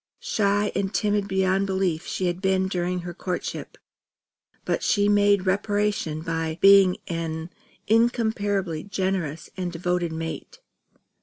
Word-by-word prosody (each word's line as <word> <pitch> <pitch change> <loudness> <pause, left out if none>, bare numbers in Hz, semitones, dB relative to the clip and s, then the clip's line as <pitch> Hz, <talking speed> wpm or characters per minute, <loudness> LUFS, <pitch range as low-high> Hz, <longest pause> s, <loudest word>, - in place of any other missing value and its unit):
Shy 205 0 +1
and 195 -1 -1
timid 205 -2 0
beyond 190 0 +1
belief 190 -3 -1
she 185 - -2
had 175 +1 -1
been 190 -1 +2
during 180 -1 -2
her 175 0 -6
courtship; 180 0 -5 0.9
but - - 0
she 205 -2 +2
made 205 -1 +3
reparation 200 -5 0
by 165 -1 -2
being 195 -2 +6
an 165 0 -4 0.3
incomparably 205 -7 +1
generous 185 -6 -3
and 180 -2 -3
devoted 175 0 -1
mate. 160 0 -6
190 Hz, 125 wpm, -25 LUFS, 175-205 Hz, 0.9 s, being